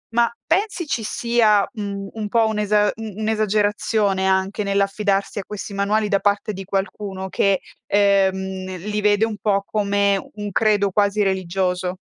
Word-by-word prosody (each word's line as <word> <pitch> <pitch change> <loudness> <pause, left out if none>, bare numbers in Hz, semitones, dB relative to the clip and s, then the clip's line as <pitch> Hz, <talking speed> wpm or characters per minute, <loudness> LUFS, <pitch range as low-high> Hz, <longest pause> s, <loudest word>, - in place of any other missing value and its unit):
Ma 235 0 +3
pensi 370 0 0
ci 240 - -1
sia, 220 -2 +2
mhmm, 200 -3 -5
un 215 -2 -4
po' 225 +1 +3
un'esa 210 -1 +2
u 225 - -8 0.2
un'esagerazione 210 -2 +1
anche 190 +2 +1
nell'affidarsi 200 0 0
a - - -4
questi 210 0 -7
manuali 205 +2 +1
da 200 -1 +2
parte 205 +2 0
di 195 0 -6
qualcuno 195 0 -3
che, 195 0 +2 0.3
ehm, 190 -2 +1
li 210 +4 -3
vede 210 +1 +3
un 220 -2 -5
po' 200 -2 +1
come 200 -1 +1 0.2
un 205 -1 -5
credo 205 -1 +2
quasi 205 +1 +2
religioso? 185 -1 -1
205 Hz, 150 wpm, -21 LUFS, 195-215 Hz, 0.3 s, Ma